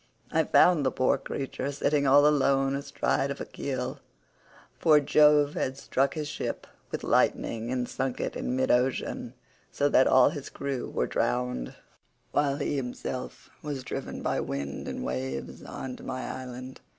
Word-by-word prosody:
I -, -, +2 dB
found 175 Hz, -5 st, +5 dB
the 130 Hz, -, +3 dB
poor 130 Hz, +2 st, +1 dB
creature 135 Hz, 0 st, -4 dB
sitting 145 Hz, 0 st, +1 dB
all 145 Hz, +2 st, +7 dB
alone 135 Hz, -2 st, +3 dB
astride 140 Hz, 0 st, -1 dB
of 140 Hz, -, -4 dB
a -, -, -4 dB
keel, 135 Hz, -2 st, -4 dB, 0.8 s
for 155 Hz, -2 st, +6 dB
Jove 150 Hz, 0 st, +5 dB
had 130 Hz, +1 st, -2 dB
struck 140 Hz, 0 st, 0 dB
his 155 Hz, -2 st, -3 dB
ship 150 Hz, -, -4 dB, 0.2 s
with -, -, -4 dB
lightning 115 Hz, +1 st, +1 dB
and 125 Hz, -1 st, -1 dB
sunk 130 Hz, -1 st, -3 dB
it -, -, -3 dB
in 125 Hz, -, -2 dB
mid 130 Hz, 0 st, +2 dB
ocean, 125 Hz, -1 st, 0 dB, 0.4 s
so 145 Hz, -, +1 dB
that 130 Hz, -, +5 dB
all 130 Hz, -1 st, +6 dB
his 145 Hz, -4 st, -6 dB
crew 140 Hz, -2 st, -4 dB
were -, -, 0 dB
drowned, 125 Hz, -, -1 dB, 0.6 s
while 140 Hz, -1 st, +1 dB
he 145 Hz, -, -1 dB
himself 125 Hz, 0 st, -5 dB
was 145 Hz, -4 st, -4 dB
driven -, -, -5 dB
by -, -, 0 dB
wind 70 Hz, 0 st, -4 dB
and -, -, -4 dB
waves 65 Hz, +1 st, -4 dB
on 130 Hz, -1 st, -6 dB
to -, -, -13 dB
my 130 Hz, 0 st, -4 dB
island. 130 Hz, 0 st, -7 dB
135 Hz, 160 wpm, -28 LUFS, 125-145 Hz, 0.8 s, all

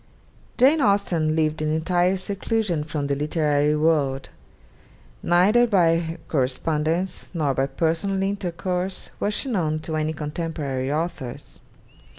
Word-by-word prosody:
Jane 280 Hz, +5 st, +5 dB
Austen 180 Hz, -, +2 dB
lived 155 Hz, -1 st, 0 dB
in 155 Hz, 0 st, 0 dB
entire 175 Hz, +4 st, +1 dB
seclusion 200 Hz, -3 st, -1 dB
from 150 Hz, -1 st, -3 dB
the 140 Hz, -, 0 dB
literary 150 Hz, 0 st, +1 dB
world: 150 Hz, -4 st, +1 dB, 0.9 s
neither 205 Hz, +8 st, +4 dB
by 165 Hz, -5 st, +2 dB
correspondence, 155 Hz, +6 st, -1 dB
nor 150 Hz, -4 st, +1 dB
by 135 Hz, +1 st, 0 dB
personal 170 Hz, +6 st, 0 dB
intercourse 185 Hz, -1 st, -3 dB
was 210 Hz, +1 st, 0 dB
she 270 Hz, -, -2 dB
known 165 Hz, -9 st, 0 dB
to 160 Hz, 0 st, -4 dB
any 155 Hz, 0 st, -1 dB
contemporary 150 Hz, -3 st, -3 dB
authors. 150 Hz, -5 st, -4 dB
165 Hz, 120 wpm, -24 LUFS, 150-185 Hz, 0.9 s, Jane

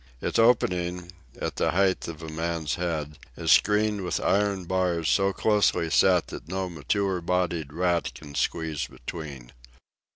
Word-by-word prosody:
Its -, -, -1 dB
opening, 90 Hz, -6 st, +2 dB, 0.3 s
at -, -, -4 dB
the -, -, +2 dB
height 95 Hz, 0 st, +2 dB
of 80 Hz, -1 st, -7 dB
a -, -, -6 dB
man's 80 Hz, -1 st, -2 dB
head, 80 Hz, -4 st, -3 dB, 0.2 s
is 80 Hz, -1 st, +1 dB
screened 105 Hz, +2 st, +3 dB
with 90 Hz, -, -1 dB
iron 100 Hz, -2 st, +1 dB
bars 90 Hz, -3 st, 0 dB
so 95 Hz, +2 st, +3 dB
closely 100 Hz, -4 st, +2 dB
set -, -, +4 dB
that -, -, -8 dB
no 95 Hz, +1 st, -2 dB
mature 90 Hz, +3 st, -1 dB
bodied 85 Hz, -4 st, -1 dB
rat 85 Hz, +1 st, 0 dB
can 75 Hz, -2 st, -11 dB
squeeze 80 Hz, +1 st, -1 dB
between. 70 Hz, -3 st, -8 dB
85 Hz, 150 wpm, -26 LUFS, 80-95 Hz, 0.3 s, set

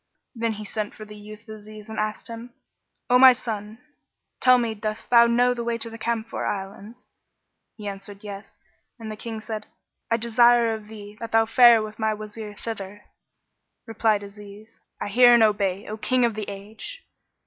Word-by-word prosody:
Then 230 Hz, -2 st, -1 dB
he 210 Hz, 0 st, -8 dB
sent 210 Hz, 0 st, -4 dB
for 215 Hz, -, -10 dB
the 210 Hz, 0 st, -12 dB
youth 210 Hz, +2 st, -12 dB
Aziz 215 Hz, -1 st, -11 dB
and 220 Hz, -1 st, -6 dB
asked 215 Hz, +1 st, -3 dB
him, 235 Hz, +1 st, -9 dB, 0.5 s
"O 250 Hz, 0 st, +5 dB
my 260 Hz, 0 st, +9 dB
son, 215 Hz, -3 st, -6 dB, 0.6 s
tell 255 Hz, 0 st, +6 dB
me 235 Hz, -2 st, -1 dB
dost 215 Hz, +2 st, -5 dB
thou 235 Hz, -1 st, +7 dB
know 245 Hz, +1 st, +3 dB
the 240 Hz, -1 st, -4 dB
way 235 Hz, 0 st, -1 dB
to 230 Hz, 0 st, -6 dB
the 225 Hz, -, -8 dB
Camphor 230 Hz, -1 st, -3 dB
Islands?" 205 Hz, +5 st, -6 dB, 0.7 s
He 210 Hz, -2 st, -7 dB
answered 200 Hz, 0 st, -8 dB
"Yes"; 200 Hz, 0 st, -9 dB, 0.4 s
and 225 Hz, -2 st, -7 dB
the -, -, -6 dB
King 220 Hz, 0 st, -7 dB
said, 215 Hz, -1 st, -6 dB, 0.4 s
"I 230 Hz, -, +2 dB
desire 235 Hz, 0 st, +4 dB
of 215 Hz, -1 st, -7 dB
thee 210 Hz, -1 st, -11 dB
that 230 Hz, -1 st, -7 dB
thou 225 Hz, 0 st, +5 dB
fare 235 Hz, -1 st, +6 dB
with 215 Hz, +1 st, -9 dB
my 220 Hz, -1 st, 0 dB
Wazir 215 Hz, 0 st, -8 dB
thither." 205 Hz, -2 st, -7 dB, 0.8 s
Replied 220 Hz, -2 st, +1 dB
Aziz, 205 Hz, +1 st, -13 dB, 0.2 s
"I -, -, -3 dB
hear 240 Hz, +3 st, +7 dB
and 235 Hz, -, +5 dB
I -, -, +8 dB
obey, 200 Hz, -2 st, -2 dB
O 215 Hz, -, -5 dB
King 250 Hz, +2 st, +2 dB
of 235 Hz, -, 0 dB
the 210 Hz, -1 st, -5 dB
Age!" 215 Hz, -, -9 dB
220 Hz, 185 wpm, -24 LUFS, 210-235 Hz, 0.8 s, my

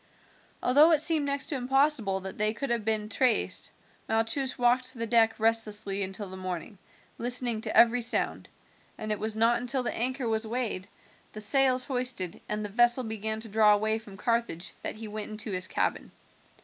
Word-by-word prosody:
Although 290 Hz, +6 st, +6 dB
it 305 Hz, -, +3 dB
seemed 315 Hz, -3 st, +1 dB
next 280 Hz, -1 st, -1 dB
to 295 Hz, -, -1 dB
impossible 260 Hz, -6 st, +1 dB
that 190 Hz, +1 st, -7 dB
they 215 Hz, +1 st, +2 dB
could 275 Hz, +1 st, -3 dB
have 235 Hz, -2 st, 0 dB
been 215 Hz, -1 st, 0 dB
traced, 230 Hz, +2 st, +1 dB, 0.4 s
Malchus 225 Hz, +4 st, 0 dB
walked 250 Hz, +2 st, +1 dB
the 230 Hz, -1 st, -3 dB
deck 225 Hz, 0 st, +3 dB
restlessly 210 Hz, -3 st, 0 dB
until 195 Hz, +1 st, -3 dB
the 190 Hz, -, -9 dB
morning, 185 Hz, +1 st, -6 dB, 0.4 s
listening 240 Hz, -2 st, -1 dB
to -, -, -3 dB
every 240 Hz, +1 st, +6 dB
sound, 235 Hz, -, -1 dB, 0.5 s
and 215 Hz, 0 st, -3 dB
it 210 Hz, -, -1 dB
was 220 Hz, 0 st, -3 dB
not 230 Hz, +2 st, +3 dB
until 255 Hz, +1 st, -1 dB
the -, -, -2 dB
anchor 255 Hz, +1 st, -2 dB
was 220 Hz, 0 st, -1 dB
weighed, 220 Hz, -5 st, -2 dB, 0.5 s
the 215 Hz, -, -7 dB
sails 255 Hz, +3 st, +3 dB
hoisted, 245 Hz, -, -1 dB
and 210 Hz, 0 st, -2 dB
the -, -, -4 dB
vessel 240 Hz, +4 st, +3 dB
began 220 Hz, -1 st, -3 dB
to 225 Hz, -, -5 dB
draw 210 Hz, 0 st, +5 dB
away 220 Hz, +1 st, 0 dB
from 205 Hz, -3 st, -13 dB
Carthage 230 Hz, -6 st, -2 dB
that -, -, -3 dB
he 220 Hz, 0 st, -7 dB
went 215 Hz, 0 st, -5 dB
into 215 Hz, 0 st, -5 dB
his 185 Hz, 0 st, -2 dB
cabin. -, -, -2 dB
225 Hz, 185 wpm, -28 LUFS, 210-250 Hz, 0.5 s, Although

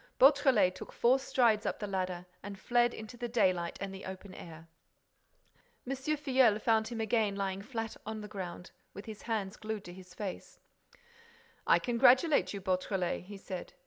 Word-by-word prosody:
Beautrelet 270 Hz, -9 st, +5 dB
took -, -, -9 dB
four 250 Hz, +3 st, +3 dB
strides 235 Hz, -5 st, +2 dB
up -, -, -2 dB
the 210 Hz, -, -4 dB
ladder 185 Hz, -2 st, -3 dB, 0.2 s
and 200 Hz, 0 st, -7 dB
fled 240 Hz, +3 st, +2 dB
into 220 Hz, +2 st, -9 dB
the 240 Hz, 0 st, -3 dB
daylight 185 Hz, -7 st, +1 dB
and 195 Hz, -1 st, -5 dB
the 195 Hz, -, -8 dB
open 190 Hz, +1 st, -8 dB
air. 165 Hz, -2 st, -11 dB, 1.2 s
M. 270 Hz, +2 st, -2 dB
Filleul 265 Hz, -5 st, +2 dB
found 220 Hz, 0 st, +2 dB
him 235 Hz, -1 st, -5 dB
again 220 Hz, -2 st, +1 dB
lying 195 Hz, -1 st, -2 dB
flat 225 Hz, 0 st, -5 dB
on 215 Hz, 0 st, -5 dB
the 210 Hz, 0 st, -10 dB
around, 180 Hz, -2 st, -6 dB, 0.2 s
with 200 Hz, -, -8 dB
his 215 Hz, -2 st, -8 dB
hands 215 Hz, -3 st, -3 dB
glued 215 Hz, -1 st, -5 dB
to 175 Hz, -, -9 dB
his 185 Hz, 0 st, -13 dB
face: 200 Hz, -3 st, -6 dB, 1.1 s
"I -, -, +6 dB
congratulate 255 Hz, +5 st, +4 dB
you, 200 Hz, -, -4 dB
Beautrelet," 185 Hz, -1 st, -1 dB
he 200 Hz, +1 st, -9 dB
said. 190 Hz, -2 st, -7 dB
210 Hz, 170 wpm, -32 LUFS, 190-240 Hz, 1.2 s, I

